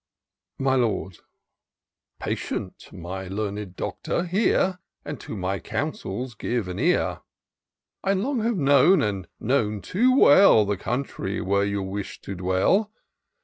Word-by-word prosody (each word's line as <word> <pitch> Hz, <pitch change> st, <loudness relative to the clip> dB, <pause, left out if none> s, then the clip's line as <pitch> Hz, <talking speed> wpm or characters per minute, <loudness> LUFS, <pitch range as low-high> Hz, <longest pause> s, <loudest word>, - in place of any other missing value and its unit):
My 135 Hz, 0 st, +1 dB
Lord. 110 Hz, -7 st, 0 dB, 0.5 s
" -, -, -61 dB
Patient, -, -, -4 dB
my 95 Hz, +2 st, -6 dB
learned 100 Hz, -1 st, -4 dB
Doctor, 170 Hz, -, -2 dB
hear; 185 Hz, 0 st, +1 dB, 0.3 s
And 145 Hz, -4 st, -5 dB
to 110 Hz, -, -7 dB
my 95 Hz, +1 st, -2 dB
counsels 130 Hz, -, -4 dB
give 115 Hz, -1 st, -2 dB
an 90 Hz, -, -5 dB
ear: -, -, +1 dB, 0.8 s
I 195 Hz, -, +2 dB
long 245 Hz, +7 st, -1 dB
have 230 Hz, -1 st, 0 dB
known, 145 Hz, +5 st, +5 dB
and 100 Hz, -5 st, -2 dB
known 110 Hz, -4 st, 0 dB
too 240 Hz, -, +2 dB
well. 145 Hz, -, +7 dB
The 100 Hz, 0 st, 0 dB
country 110 Hz, -2 st, -3 dB
where 100 Hz, +2 st, +1 dB
you 100 Hz, -1 st, -2 dB
wish 95 Hz, +1 st, -5 dB
to 100 Hz, -, -6 dB
dwell. 95 Hz, -, +1 dB
110 Hz, 135 wpm, -25 LUFS, -, 0.8 s, well